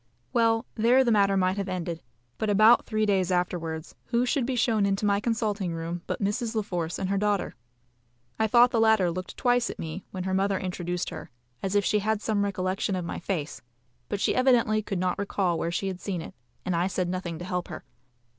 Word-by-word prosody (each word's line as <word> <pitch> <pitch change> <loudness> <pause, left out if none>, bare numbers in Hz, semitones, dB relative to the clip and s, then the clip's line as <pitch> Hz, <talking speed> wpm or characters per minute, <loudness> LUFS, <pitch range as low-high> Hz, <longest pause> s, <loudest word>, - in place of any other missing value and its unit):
Well, 230 -1 +3
there 245 +4 +4
the 240 - +2
matter 200 -2 +3
might 185 +1 +1
have 200 -1 -2
ended; 175 -2 -3 0.4
but 220 - 0
about 215 +4 +5
three 215 -1 +1
days 190 -3 +1
afterwards 170 -3 -2
who 240 +1 +1
should 255 -1 0
be 265 - -1
shown 220 -3 +2
into 200 +1 +1
my 200 -1 +3
consulting 210 -5 -1
room 165 +1 -4
but - - -3
Mrs. 220 +3 -1
La 215 - +1
Force 175 -4 -3
and 190 - -2
her 200 - +1
daughter. 205 -2 0 0.9
I 220 - +3
thought 240 +3 +6
the 230 - +1
latter 220 -5 +4
looked 185 +1 -6
twice 245 -1 +2
at - - -6
me, 165 +3 -6
when 185 -1 -5
her 190 0 -2
mother 195 +1 +1
introduced 180 -1 -3
her, 160 - -8 0.3
as 195 +1 -2
if 205 -1 +3
she 210 - +2
had 215 +1 0
some 210 -1 0
recollection 190 0 -1
of 180 -2 -3
my - - -4
face; 165 -5 -4 0.5
but 205 - -2
she - - +2
evidently 240 -4 +3
could 200 -2 -4
not 180 +1 -1
recall 190 -4 0
where 170 - -1
she 175 - -2
had 185 -1 -5
seen 180 -5 -3
it, - - -10 0.3
and 180 - 0
I 175 +2 +1
said 185 -2 -1
nothing 175 -2 -3
to 175 - -7
help 180 -1 -3
her. - - -8
195 Hz, 220 wpm, -27 LUFS, 180-220 Hz, 0.9 s, thought